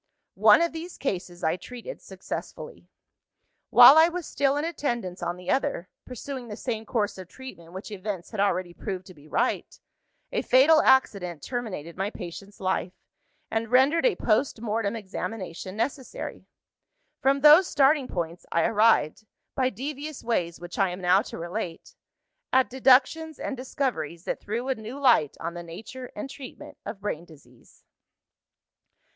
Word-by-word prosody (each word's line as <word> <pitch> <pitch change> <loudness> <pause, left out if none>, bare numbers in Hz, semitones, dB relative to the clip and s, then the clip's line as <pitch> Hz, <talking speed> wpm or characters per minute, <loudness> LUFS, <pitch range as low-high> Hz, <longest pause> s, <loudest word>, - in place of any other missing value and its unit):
One - - +7
of 335 - 0
these 330 +2 -7
cases 180 -7 -4
I 160 +3 +1
treated 245 +6 -9
successfully. 190 -1 -8 0.8
While 310 - +10
I 325 +1 +7
was 350 -1 -5
still 280 0 +1
in 295 - -1
attendance 240 - -3
on 175 - -2
the 180 0 -4
other, 265 -10 -1 0.2
(pursuing 255 0 -7
the 210 - -6
same 225 -2 -4
course 210 -5 -1
of 185 - -9
treatment 180 -9 -11
which 190 +3 -8
events 195 -3 -5
had 215 - -6
already 185 -3 +1
proved 185 0 -5
to 185 - -12
be 150 -2 -18
right), 240 +11 -1 0.5
a - - 0
fatal 295 +5 +6
accident 190 - +2
terminated 195 - -5
my 195 +2 -1
patient's 195 +1 -9
life, 185 -1 -1 0.6
and 225 0 -1
rendered 275 - +4
a 475 - +1
post 230 +2 +1
mortem 220 -1 -1
examination 190 -3 -6
necessary. 260 +3 -4 0.7
From 275 +1 +2
those 305 +5 +8
starting 280 -1 +3
points, 170 0 -4
I 165 - +2
arrived 215 -3 +3 0.3
by 260 -1 +1
devious 285 +5 -6
ways 175 -8 -1
which 175 +3 -8
I 195 -1 +3
am 180 +1 -6
now 180 +2 +4
to - - -8
relate 170 0 -5 0.6
at 260 -1 +3
deductions 270 +5 +3
and 275 - -4
discoveries 240 - -3
that - - -3
threw 230 +5 -3
a 265 - +2
new 230 +3 -8
light 235 - +3
on 170 +1 -4
the 175 - -6
nature 225 +10 -9
and 210 - -5
treatment 275 -1 -11
of 200 - -6
brain 170 -5 -3
disease." 140 -8 -19
220 Hz, 155 wpm, -26 LUFS, 180-265 Hz, 0.8 s, While